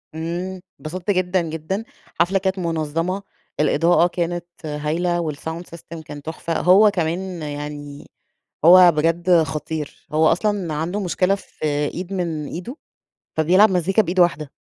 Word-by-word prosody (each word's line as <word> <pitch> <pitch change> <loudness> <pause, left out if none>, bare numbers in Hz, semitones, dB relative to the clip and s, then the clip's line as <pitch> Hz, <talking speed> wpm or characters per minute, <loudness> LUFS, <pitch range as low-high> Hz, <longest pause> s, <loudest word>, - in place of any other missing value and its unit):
إمم، 175 +3 -4 0.2
اتبسطت 175 +5 -3
جدًا 185 -1 +1
جدًا، 165 +5 -4 0.4
حفلة 185 +3 +3
كانت 190 0 -1
منظمة، 165 +3 -2 0.4
الإضاءة 165 +4 +4
كانت 175 0 -3 0.2
هايلة 160 +4 -1
والsound 160 +4 -6
system 170 -1 -10
كان 145 -1 -8
تحفة، 160 +2 -3
هو 195 +4 +6
كمان 175 0 -2
يعني، 145 -1 -7 0.6
هو 180 +1 +9
بجد 165 +2 +3
خطير، 155 0 -5
هو 155 +1 +4
أصلًا 190 -2 0
عنده 165 +7 -2
مشكلة 185 +1 +1
في 195 - -8 0.3
إيد 185 +2 -5
من 165 -5 -2
إيده، 180 - -7 0.6
فبيلعب 185 +7 +5
مزيكا 190 +4 +2
بإيد 180 0 -1
واحدة 155 -5 +2
170 Hz, 130 wpm, -21 LUFS, 155-185 Hz, 0.6 s, هو